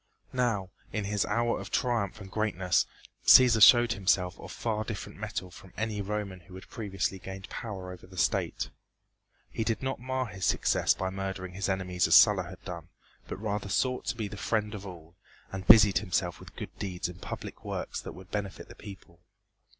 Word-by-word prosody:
Now, 115 -7 0 0.2
in 110 - -2
his 100 0 0
hour 115 +3 +1
of - - -7
triumph 110 -5 0
and 95 -2 -10
greatness, 95 -4 +1 0.4
Cæsar 120 -4 +8
showed 120 +2 +8
himself 95 -2 +1
of - - -9
far 110 -2 -2
different 110 -2 -7
mettle 105 -4 -4
from 95 +1 -14
any 110 -1 -2
Roman 100 -2 -4
who 90 +2 -14
had 95 - -11
previously 95 -3 -3
gained 95 +1 -8
power 95 -5 -6
over 90 - -11
the 95 0 -14
state. 80 - 0 0.8
He 115 - -2
did 115 +3 -1
not 130 -2 -2
mar 130 +1 -2
his 95 -4 -8
success - - +2
by 95 0 -2
murdering 95 -1 -4
his 95 +2 -2
enemies 90 -2 0
as 80 - +6
Sulla 100 -2 +7
had 90 +1 -11
done, 85 -3 -7 0.4
but - - -5
rather 105 -2 -3
sought 125 +5 0
to - - -1
be 110 -3 -2
the 100 - -8
friend 105 0 -1
of 100 -1 -7
all, 85 -3 -11 0.4
and 95 0 -6
busied 105 -4 +8
himself 90 -3 -1
with - - -13
good - - -7
deeds 90 -4 -3
and 90 -1 -10
public - - -7
works - - -4
that - - -8
would 95 +1 -13
benefit 100 -2 -4
the - - -10
people. 95 -5 -12
100 Hz, 190 wpm, -29 LUFS, 95-110 Hz, 0.8 s, Cæsar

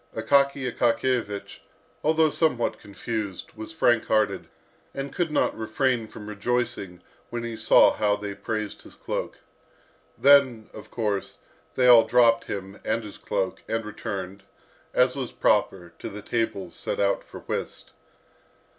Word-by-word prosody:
Akaky 140 +4 +2
Akakiyevich, 120 -3 -1 0.4
although 160 0 +3
somewhat 150 -8 +1
confused, 100 -1 -5
was 110 +6 -7
frank 120 -7 +2
hearted, 110 0 +1 0.5
and 140 0 -5
could 175 -2 0
not 150 - +1
refrain 115 +1 0
from 105 -1 -11
rejoicing 105 -4 -2 0.3
when 120 -1 -4
he 115 -1 -4
saw - - +5
how 105 -1 +1
they 105 -1 -5
praised 105 +1 -4
his - - -14
cloak. - - -4 0.8
Then, 130 -6 +4
of - - -11
course, 105 -4 -2 0.4
they 130 - +2
all 120 -2 +8
dropped 115 -2 +4
him 100 0 -6
and 110 +1 -1
his 105 -2 -10
cloak, 95 -2 -2
and 115 0 -2
returned, 100 -2 -6 0.5
as 125 0 +3
was 130 -3 -4
proper, 90 -4 +1
to - - -5
the 105 +1 -9
tables 110 -6 -2
set - - -4
out 100 0 +1
for - - -11
whist. - - -5
110 Hz, 140 wpm, -25 LUFS, 100-125 Hz, 0.8 s, all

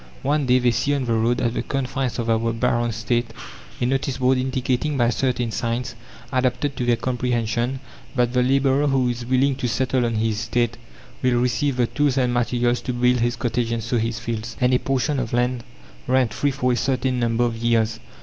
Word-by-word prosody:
One 145 0 +1
day 125 0 +5
they 125 -1 +3
see 125 +5 0
on 135 -2 -1
the 115 - 0
road 115 +2 +1
at 120 -1 0
the - - -1
confines 135 -1 -2
of 115 -2 -2
our 115 0 +1
baron's 120 -1 0
estate 120 +1 -1 0.5
a 120 - 0
notice 135 0 -1
board 130 0 +2
indicating 130 +2 -1
by 120 -1 +3
certain 125 -2 -1
signs 115 +2 -2 0.4
adapted 130 +2 0
to 125 - -2
their 120 - +4
comprehension 120 +1 -1 0.4
that 125 -1 +1
the 125 - +3
labourer 135 +2 +2
who 135 -3 +2
is 120 0 -4
willing 130 +2 +2
to 125 - -2
settle 130 +3 0
on 115 - -2
his 110 -1 0
estate 120 +1 0 0.5
will 125 -2 +2
receive 125 +2 0
the 125 - +3
tools 145 +1 0
and 125 -2 +2
materials 120 0 +1
to 125 - -3
build 125 0 +2
his 120 +1 +1
cottage 120 -1 -1
and 115 -1 -2
sow 120 +1 0
his 115 0 -1
fields, 115 0 -5
and 125 0 +3
a 125 - +4
portion 135 +1 0
of 120 -3 -3
land 120 0 0 0.4
rent 130 -4 +2
free 145 - +1
for 130 -2 0
a - - +2
certain 130 0 0
number 115 0 +1
of 120 -1 0
years. 115 -1 +1
125 Hz, 205 wpm, -22 LUFS, 115-130 Hz, 0.5 s, day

